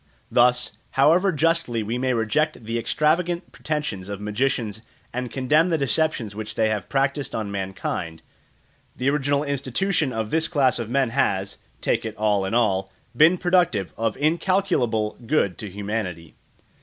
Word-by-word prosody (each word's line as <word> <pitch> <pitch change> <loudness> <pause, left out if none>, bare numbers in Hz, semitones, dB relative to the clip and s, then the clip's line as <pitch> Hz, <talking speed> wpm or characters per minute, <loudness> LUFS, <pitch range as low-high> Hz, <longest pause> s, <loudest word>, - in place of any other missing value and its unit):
Thus, 125 0 +3 0.3
however 170 +8 +5
justly 160 -7 +1
we 115 +4 -2
may 130 0 +1
reject 115 +3 0
the 115 +1 -2
extravagant 170 +7 0
pretensions 125 -8 -3
of 100 -1 -5
magicians 105 0 -1 0.3
and 125 0 -3
condemn 150 +6 +2
the 165 - +2
deceptions 140 -6 0
which 110 +1 -6
they 110 -1 +2
have 105 -3 -3
practised 140 +1 0
on 105 -2 -3
mankind, 95 -4 -4 0.7
the 130 +3 +1
original 145 0 +1
institution 140 +3 0
of 110 -2 -3
this 160 0 +2
class 135 -8 +2
of 115 -2 -4
men 130 -1 +1
has, 100 -7 0 0.2
take - - +1
it 110 -1 -5
all 105 -3 +1
in 95 - -2
all, 95 -5 +1 0.2
been 160 +7 +6
productive 175 - +1
of 115 -1 -1
incalculable 150 - +1
good 100 - +2
to 105 - -6
humanity. 100 -5 -4
125 Hz, 150 wpm, -24 LUFS, 105-150 Hz, 0.7 s, been